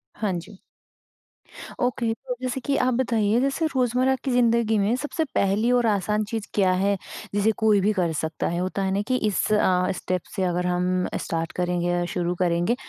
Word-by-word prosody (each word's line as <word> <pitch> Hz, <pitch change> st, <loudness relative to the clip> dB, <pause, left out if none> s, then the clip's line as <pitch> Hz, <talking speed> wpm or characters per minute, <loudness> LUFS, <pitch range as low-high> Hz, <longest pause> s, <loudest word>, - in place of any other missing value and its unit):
हाँ 210 Hz, -3 st, -1 dB
जी। 175 Hz, +2 st, -7 dB, 1.2 s
ओके। 240 Hz, -2 st, 0 dB
तो 250 Hz, +2 st, -6 dB
जैसे 255 Hz, +1 st, -2 dB
कि 275 Hz, +2 st, -1 dB
आप 255 Hz, 0 st, +2 dB
बताइए, 230 Hz, -3 st, +1 dB
जैसे 275 Hz, +4 st, 0 dB
रोज़मर्रा 255 Hz, -1 st, +1 dB
की 270 Hz, -, -1 dB
ज़िंदगी 235 Hz, -2 st, +3 dB
में 205 Hz, +3 st, +2 dB
सबसे 295 Hz, +5 st, -2 dB
पहली 205 Hz, +5 st, +2 dB
और 245 Hz, -1 st, +3 dB
आसान 210 Hz, +1 st, +1 dB
चीज़ 220 Hz, -2 st, -4 dB
क्या 190 Hz, -3 st, +3 dB
है, 200 Hz, +2 st, +1 dB, 0.4 s
जिसे 205 Hz, +2 st, +3 dB
कोई 215 Hz, -2 st, +4 dB
भी 210 Hz, +3 st, +2 dB
कर 180 Hz, -4 st, 0 dB
सकता 160 Hz, +1 st, -2 dB
है? 170 Hz, -, -2 dB
होता 185 Hz, +2 st, -2 dB
है 190 Hz, -, 0 dB
ना 200 Hz, -, +1 dB
कि 255 Hz, -, +1 dB
इस 205 Hz, -, 0 dB
अ, 185 Hz, -3 st, +2 dB
स्टेप 185 Hz, 0 st, -2 dB
से 190 Hz, -, 0 dB
अगर 180 Hz, 0 st, 0 dB
हम 180 Hz, +1 st, 0 dB, 0.2 s
स्टार्ट 165 Hz, -1 st, -3 dB
करेंगे 175 Hz, -1 st, -1 dB
या 175 Hz, 0 st, +1 dB
शुरू 175 Hz, 0 st, -1 dB
करेंगे 175 Hz, +5 st, +1 dB
205 Hz, 190 wpm, -24 LUFS, 180-240 Hz, 1.2 s, कोई